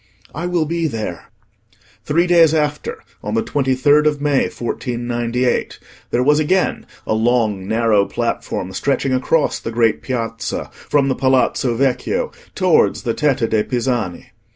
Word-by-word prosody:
I 170 Hz, +4 st, -3 dB
will 175 Hz, -3 st, +1 dB
be 165 Hz, +1 st, -1 dB
there." 110 Hz, -, -5 dB, 0.8 s
Three 170 Hz, +4 st, +2 dB
days 165 Hz, -3 st, +5 dB
after, 150 Hz, -1 st, -2 dB, 0.2 s
on 105 Hz, +1 st, -3 dB
the 115 Hz, -, +1 dB
23rd 145 Hz, +2 st, +2 dB
of 150 Hz, -1 st, 0 dB
May 145 Hz, -2 st, +1 dB
1498, 120 Hz, 0 st, -2 dB, 0.3 s
there 125 Hz, -, +1 dB
was 150 Hz, +3 st, +4 dB
again 185 Hz, +5 st, 0 dB, 0.2 s
a -, -, 0 dB
long 110 Hz, -4 st, +1 dB
narrow 110 Hz, -2 st, +2 dB
platform 95 Hz, +1 st, -3 dB
stretching 135 Hz, -1 st, 0 dB
across 145 Hz, +4 st, +1 dB
the -, -, -5 dB
great 115 Hz, -1 st, +1 dB
piazza, 115 Hz, -3 st, -4 dB
from 140 Hz, -2 st, 0 dB
the 135 Hz, -, +2 dB
Palazzo 130 Hz, -2 st, +1 dB
Vecchio 140 Hz, -, 0 dB, 0.2 s
towards 185 Hz, -4 st, +2 dB
the 120 Hz, -3 st, 0 dB
Tetta 135 Hz, -5 st, +1 dB
de' 110 Hz, -1 st, +1 dB
Pisani. 120 Hz, -7 st, -2 dB
130 Hz, 140 wpm, -19 LUFS, 115-150 Hz, 0.8 s, days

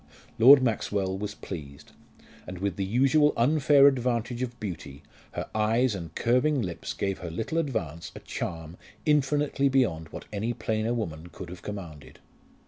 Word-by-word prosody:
Lord 130 Hz, +3 st, +9 dB
Maxwell 100 Hz, -5 st, 0 dB
was 105 Hz, +1 st, -5 dB
pleased; 70 Hz, -6 st, -9 dB, 0.6 s
and 90 Hz, -, -6 dB
with 95 Hz, -1 st, -2 dB
the 100 Hz, -, -2 dB
usual 135 Hz, +8 st, +3 dB
unfair 140 Hz, +2 st, +5 dB
advantage 125 Hz, -3 st, +1 dB
of 120 Hz, -1 st, -4 dB
beauty 80 Hz, -8 st, -7 dB, 0.3 s
her -, -, -4 dB
eyes 110 Hz, +3 st, +2 dB
and 85 Hz, -4 st, -7 dB
curving 125 Hz, +5 st, +2 dB
lips 90 Hz, -3 st, -5 dB
gave 95 Hz, -1 st, -2 dB
her 90 Hz, -, -6 dB
little 110 Hz, -, -2 dB
advance 85 Hz, -, -3 dB
a -, -, -7 dB
charm 80 Hz, +1 st, -6 dB, 0.3 s
infinitely 145 Hz, -1 st, +2 dB
beyond 90 Hz, -13 st, +1 dB
what -, -, -9 dB
any 110 Hz, +4 st, -1 dB
plainer 110 Hz, +1 st, -1 dB
woman 85 Hz, -8 st, -4 dB
could 90 Hz, 0 st, -9 dB
have 90 Hz, 0 st, -9 dB
commanded. 80 Hz, -10 st, -8 dB
110 Hz, 150 wpm, -27 LUFS, 90-130 Hz, 0.6 s, Lord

